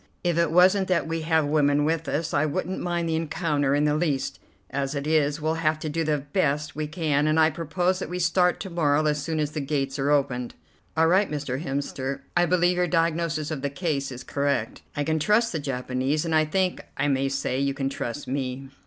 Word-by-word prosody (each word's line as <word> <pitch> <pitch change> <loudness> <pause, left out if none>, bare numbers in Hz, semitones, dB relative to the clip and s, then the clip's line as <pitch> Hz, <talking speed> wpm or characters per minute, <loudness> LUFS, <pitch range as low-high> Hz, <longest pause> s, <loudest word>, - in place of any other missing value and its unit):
If 175 -2 +1
it 170 -2 +2
wasn't 185 +3 +5
that 170 -4 +1
we 165 0 -2
have 160 -1 +2
women 145 -1 +2
with 160 -1 -1
us, 160 +2 -2
I - - +3
wouldn't 160 +5 -2
mind 175 -1 -1
the 160 - 0
encounter 150 -3 0
in 145 +1 +2
the 150 - +2
least. 150 -4 -1 0.3
As 135 +2 -2
it 140 0 -3
is, 150 -1 +2
we'll 155 +1 0
have 155 -1 +2
to 155 0 -4
do 165 +2 -1
the 155 -1 +1
best 145 0 -1
we 155 0 -2
can, 150 -2 0
and 155 +1 +3
I 160 0 +5
propose 175 +4 -1
that - - -5
we 180 - -3
start 180 +1 +2
to 190 - -6
morrow 155 -3 +2
as 150 -1 +1
soon 160 +2 -2
as 150 -1 -1
the 150 - -3
gates 140 -1 -2
are 135 +1 +1
opened." 125 -4 0 0.4
"All 160 - +5
right, 190 +5 +3
Mr. 145 -1 -3
Hemster, 135 -1 -3
I 175 0 +4
believe 175 0 +2
your 180 0 +2
diagnosis 165 -2 0
of 150 -4 -3
the 140 - -1
case 140 -3 -2
is 125 0 -7
correct. 140 -6 -1 0.2
I 145 - +1
can 160 +2 0
trust 215 +7 +3
the 160 - -2
Japanese, 135 +2 -1
and 165 - -1
I 155 0 +4
think 185 +3 0 0.2
I 140 - +1
may 135 -1 +1
say 135 -1 -1
you 140 0 0
can 135 -1 -1
trust 135 0 -4
me." 135 0 -3
150 Hz, 225 wpm, -25 LUFS, 140-165 Hz, 0.4 s, wasn't